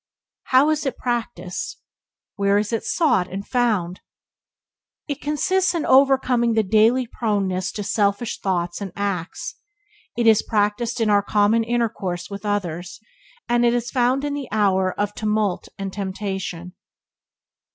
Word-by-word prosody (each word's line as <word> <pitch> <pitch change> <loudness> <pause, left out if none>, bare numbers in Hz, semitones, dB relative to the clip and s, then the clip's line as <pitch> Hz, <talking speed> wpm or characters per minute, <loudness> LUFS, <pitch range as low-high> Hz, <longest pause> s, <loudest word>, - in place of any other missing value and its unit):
How 270 +4 +4
is 305 -1 0
it 270 - -3
practiced? 230 -7 -3 0.6
Where 200 0 +2
is 210 +2 -1
it 225 - -1
sought 295 - +1
and 195 +2 -5
found? 210 -8 0 1.1
It 285 -1 -4
consists 360 +5 +1
in 330 - -1
overcoming 260 -3 +4
the 220 - +3
daily 220 +5 +3
proneness 200 -5 -1
to 210 - -4
selfish 200 +2 0
thoughts 175 -1 -2
and 195 -2 -5
acts; 195 -4 -3 0.6
it 235 - +1
is 220 -2 +6
practiced 220 +3 0
in 215 -2 +2
our 205 0 +5
common 210 +2 +2
intercourse 220 -6 -2
with 200 +1 -6
others; 180 -4 -3 0.5
and 240 0 +2
it 240 0 +3
is 240 +1 -2
found 260 +2 +1
in 290 - -2
the 285 -3 -4
hour 190 -3 +2
of 205 0 0
tumult 210 -3 -1
and 195 -1 -5
temptation. 190 -3 -4
210 Hz, 140 wpm, -22 LUFS, 195-240 Hz, 1.1 s, is